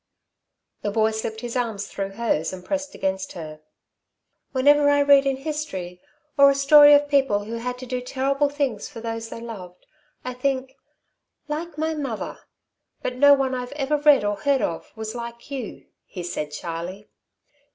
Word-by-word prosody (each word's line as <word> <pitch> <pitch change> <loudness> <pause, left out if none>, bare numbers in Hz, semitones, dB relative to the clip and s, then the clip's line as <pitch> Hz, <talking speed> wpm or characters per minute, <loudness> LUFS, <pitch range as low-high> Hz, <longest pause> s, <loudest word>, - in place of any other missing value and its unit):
The 205 - -1
boy 220 +1 +2
slipped 220 0 -4
his 240 0 -5
arms 225 -5 -2
through 195 0 -5
hers 195 -8 -1
and 185 -1 -9
pressed 285 0 -3
against 190 0 -2
her. 155 -3 -8 0.9
"Whenever 285 +2 +4
I 285 0 +4
read 280 -1 +6
in 270 -1 0
history 265 - -5 0.4
or 280 0 +9
a 275 - +2
story 290 +1 +8
of 290 0 +3
people 270 -8 +2
who 225 +3 -5
had 250 +2 -4
to 255 - -8
do 250 0 -3
terrible 275 +3 0
things 280 -7 -2
for 260 -6 -9
those 225 0 -5
they - - -7
loved, 185 -6 -9 0.4
I 255 - -3
think: 265 +1 -2 0.7
'Like 310 +1 -5
my 315 +1 0
mother!' 275 -8 -4 0.6
But 250 - -3
no 285 +1 +7
one 270 -1 -1
I've 250 +1 -4
ever 290 +1 0
read, 295 -4 +5
or 205 0 -1
heard 275 +1 +1
of, 165 - -3
was 220 -1 -5
like 235 +2 -8
you," 260 -6 -6 0.2
he 180 - -7
said 150 -4 -4
shyly. 170 +6 -6
250 Hz, 170 wpm, -24 LUFS, 205-280 Hz, 0.9 s, or